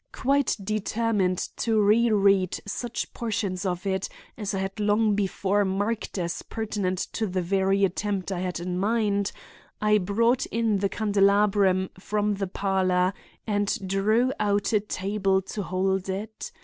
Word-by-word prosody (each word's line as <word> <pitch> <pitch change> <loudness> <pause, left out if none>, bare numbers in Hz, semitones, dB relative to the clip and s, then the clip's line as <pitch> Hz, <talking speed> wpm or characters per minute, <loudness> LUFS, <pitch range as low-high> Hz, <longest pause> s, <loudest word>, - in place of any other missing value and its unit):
Quite 275 0 +1
determined 215 -2 0 0.2
to 225 -2 +1
reread 205 -3 +3
such 235 +4 -4
portions 205 -4 -2
of 180 +1 -3
it, 190 -1 -1 0.3
as 205 -2 -3
I - - -1
had 195 +2 -4
long 210 +1 +3
before 200 0 +1
marked 205 +3 -2
as 170 -2 -2
pertinent 205 -4 -3 0.2
to 220 - -1
the 185 -1 -2
very 195 +2 +2
attempt 195 +1 -2
I 185 - -2
had 180 -1 -3
in 180 +1 -3
mind, 205 -1 +1 0.5
I 210 0 +3
brought 230 +7 +1
in 225 -3 0
the 200 0 +1
candelabrum 200 -2 +2
from 210 +2 0
the 195 -1 -2
parlor 185 -1 +1 0.3
and 205 -2 0
drew 215 +7 +2
out 205 0 +1
a 210 - +5
table 195 -1 0
to 210 - -2
hold 190 +1 -1
it. 210 +3 -5
200 Hz, 145 wpm, -26 LUFS, 190-215 Hz, 0.5 s, a